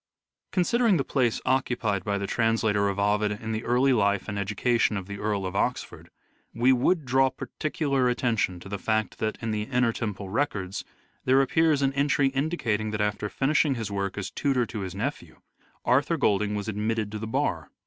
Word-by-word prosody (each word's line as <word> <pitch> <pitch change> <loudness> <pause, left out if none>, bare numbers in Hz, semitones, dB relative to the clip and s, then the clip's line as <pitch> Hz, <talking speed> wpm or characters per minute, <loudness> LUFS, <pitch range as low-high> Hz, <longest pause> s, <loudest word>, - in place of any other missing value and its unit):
Considering 210 +2 +3
the 140 - 0
place 125 -4 +1
occupied 120 -7 0
by 100 0 -1
the 100 - -3
translator 110 -2 +1
of 100 - -3
Ovid 105 +1 +1
in 110 +2 -6
the 110 +1 -2
early 130 +3 +3
life 100 -3 +1
and 105 -1 -3
education 105 +2 +1
of 95 - -5
the 100 +1 -7
Earl 105 -2 -1
of 95 +1 -4
Oxford, - - -2 0.5
we 125 +3 +4
would 145 +5 +1
draw 130 +1 +3
particular 140 -2 -1
attention 115 -7 0
to - - -10
the 100 0 -4
fact 110 0 -1
that, 110 0 -1
in 115 - -1
the 105 -1 -1
Inner 125 +1 +1
Temple 105 -4 -4
Records, 100 -5 -2 0.4
there 130 +1 +4
appears 150 +1 +3
an 135 0 +2
entry 140 0 +2
indicating 130 -7 -1
that 110 0 -3
after 105 0 -1
finishing 140 +2 +2
his 110 -4 -4
work 100 -1 -2
as 100 -1 -4
tutor 130 -1 +1
to 115 -1 -6
his 95 -2 -5
nephew, 135 +9 -4 0.5
Arthur - - +2
Golding 105 +1 +1
was 105 0 -4
admitted 110 0 -1
to 105 - -5
the 110 - -5
Bar. 110 - -1
110 Hz, 190 wpm, -26 LUFS, 105-130 Hz, 0.5 s, we